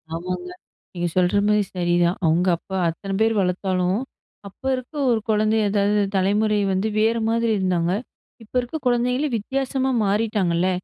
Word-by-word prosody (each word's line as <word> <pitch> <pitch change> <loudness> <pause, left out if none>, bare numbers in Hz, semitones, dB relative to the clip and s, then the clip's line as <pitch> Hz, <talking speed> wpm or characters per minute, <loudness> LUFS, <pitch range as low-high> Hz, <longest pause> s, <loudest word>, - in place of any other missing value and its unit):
ஆமாங்க. 180 +1 -4 0.4
நீங்க 175 -1 -2
சொல்றமாரி 205 +3 +3
சரிதான். 175 0 +1
அவுங்க 165 +3 +2
அப்ப - - -38 0.2
அத்தனை 195 +4 -5
பேரு 225 0 +3
வளர்த்தாலும், 185 +1 0 0.5
அப்ப 195 - -16
இருக்க 255 +4 -8 0.2
ஒரு 225 - +2
குழந்தை 215 +1 +2
ஏதாவது 205 +1 +2
தலைமுறை 210 +2 +2
வந்து 190 +3 0
வேற 225 +2 +2
மாதிரி 230 0 +1
இருந்தாங்க. 180 -2 0 0.5
இப்போ 220 - -18
இருக்க 245 +6 -5
குழந்தைங்களே 250 +4 +1
வித்தியாசமா 265 +3 -1
மாறிட்டாங்கல்ல. 195 -4 +1
205 Hz, 135 wpm, -22 LUFS, 180-225 Hz, 0.5 s, சொல்றமாரி